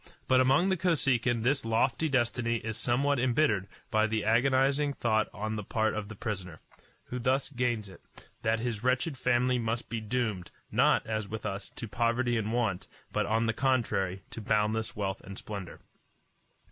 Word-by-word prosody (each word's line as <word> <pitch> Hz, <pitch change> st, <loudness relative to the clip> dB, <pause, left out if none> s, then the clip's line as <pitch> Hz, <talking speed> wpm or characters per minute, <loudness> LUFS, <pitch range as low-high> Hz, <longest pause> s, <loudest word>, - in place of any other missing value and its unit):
But 130 Hz, 0 st, +5 dB
among 135 Hz, +9 st, +4 dB
the 190 Hz, -, +2 dB
Kosekin 130 Hz, -9 st, +2 dB
this 135 Hz, +3 st, +2 dB
lofty 120 Hz, +7 st, +1 dB
destiny 120 Hz, -2 st, +1 dB
is 110 Hz, -1 st, -4 dB
somewhat 135 Hz, +4 st, +1 dB
embittered 120 Hz, -6 st, +2 dB, 0.2 s
by 110 Hz, 0 st, +3 dB
the 110 Hz, -1 st, -1 dB
agonizing 135 Hz, +5 st, +3 dB
thought 110 Hz, -4 st, +1 dB
on 110 Hz, +1 st, -3 dB
the 105 Hz, -, -4 dB
part 110 Hz, +2 st, 0 dB
of 105 Hz, -1 st, -4 dB
the 110 Hz, -, -9 dB
prisoner, 95 Hz, -6 st, -5 dB, 0.4 s
who 125 Hz, -, -5 dB
thus 130 Hz, +3 st, +1 dB
gains 120 Hz, -5 st, -1 dB
it, 95 Hz, -, -13 dB, 0.4 s
that 110 Hz, 0 st, +1 dB
his 115 Hz, -2 st, -3 dB
wretched 130 Hz, +5 st, +1 dB
family 125 Hz, 0 st, +2 dB
must 115 Hz, 0 st, -2 dB
be 115 Hz, -1 st, -2 dB
doomed, 110 Hz, -6 st, -2 dB, 0.2 s
not, -, -, +3 dB
as 110 Hz, -2 st, -2 dB
with 110 Hz, +1 st, -6 dB
us, 100 Hz, -1 st, -4 dB
to 115 Hz, -, -7 dB
poverty 120 Hz, +2 st, +1 dB
and 110 Hz, -1 st, -1 dB
want, 115 Hz, -6 st, -1 dB, 0.2 s
but, -, -, 0 dB
on 110 Hz, +1 st, +2 dB
the 115 Hz, -, +1 dB
contrary, 110 Hz, -8 st, 0 dB
to 115 Hz, -, -6 dB
boundless 110 Hz, +1 st, 0 dB
wealth 95 Hz, -2 st, -2 dB
and 95 Hz, +1 st, -9 dB
splendor. 100 Hz, -4 st, -7 dB
115 Hz, 170 wpm, -30 LUFS, 110-130 Hz, 0.4 s, But